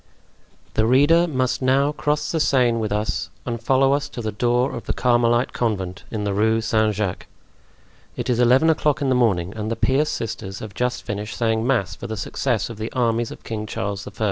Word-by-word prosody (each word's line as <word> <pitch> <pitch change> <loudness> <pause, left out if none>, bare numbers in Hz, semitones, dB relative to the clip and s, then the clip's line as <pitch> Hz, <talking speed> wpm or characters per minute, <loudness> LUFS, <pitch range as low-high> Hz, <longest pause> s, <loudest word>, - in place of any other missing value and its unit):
The 110 - +2
reader 145 +7 +5
must 130 -3 -1
now 135 +3 +3
cross 150 0 -1
the 165 - 0
Seine 125 -6 +3
with 110 -2 -2
us 105 +1 -1 0.2
and 115 -2 -3
follow 135 +1 +3
us 145 0 -1
to 120 - -6
the 110 - -2
door 120 +4 +1
of 115 - -8
the - - 0
Carmelite 120 0 +2
Convent 95 -6 -2
in 110 -2 -3
the 100 -1 -1
Rue 110 +3 +2
Saint 110 -1 +1
Jacques. 100 -3 -3 0.9
It - - -3
is 120 -2 +1
eleven 130 +7 +5
o'clock 150 -2 0
in 135 - +1
the - - +3
morning 100 -7 +1
and 110 0 -3
the 115 - -1
pious 135 +6 +1
sisters 100 -3 -4
have 110 -2 -8
just 125 +1 -2
finished 105 +1 -5
saying 110 0 0
mass 100 -8 +1
for 120 - -7
the 110 -1 -5
success 120 +3 -1
of 115 -3 -9
the 110 +1 -4
armies 120 -2 +1
of - - -11
King 110 -1 -5
Charles 100 0 -4
I. - - -7
120 Hz, 210 wpm, -22 LUFS, 110-130 Hz, 0.9 s, reader